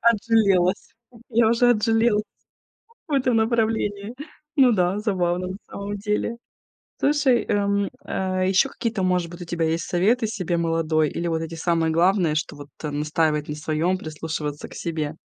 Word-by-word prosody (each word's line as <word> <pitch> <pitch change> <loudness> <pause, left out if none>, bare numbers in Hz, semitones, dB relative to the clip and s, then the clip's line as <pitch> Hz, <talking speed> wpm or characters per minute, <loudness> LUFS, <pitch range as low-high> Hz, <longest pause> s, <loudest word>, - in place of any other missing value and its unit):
отжалелась, 205 -5 +2 0.4
я 225 -1 +4
уже 245 +1 +4
отжалелась 225 -1 +2 0.9
в 300 - -6
этом 255 -3 +2
направлении. 220 -2 0 0.4
Ну 260 -3 +6
да, 185 -1 +1
забавно 180 -4 0
на 190 - -5
самом 200 +1 -5
деле. 210 +3 -2 0.6
Слушай, 275 -4 +3
эм, 200 -1 +1 0.2
э, 185 0 -1
ещё 195 +8 +3
какие-то, 230 -5 -2
может 180 -2 +1
быть, 175 +1 -9
у - - -5
тебя 165 -1 -1
есть 165 +1 -1
советы 220 +7 +2
себе 185 -5 -2
молодой 165 -2 +1
или 170 - -3
вот 165 0 -1
эти 165 +1 -6
самые 165 -1 0
главные, 175 -1 +3
что 155 - -3
вот, 145 0 -10 0.2
э, 150 - -1
настаивать 150 +1 0
на 150 - -3
своём, 160 +4 -1
прислушиваться 155 -2 -5
к - - -13
себе? 160 -3 -3
185 Hz, 155 wpm, -23 LUFS, 165-220 Hz, 0.9 s, Ну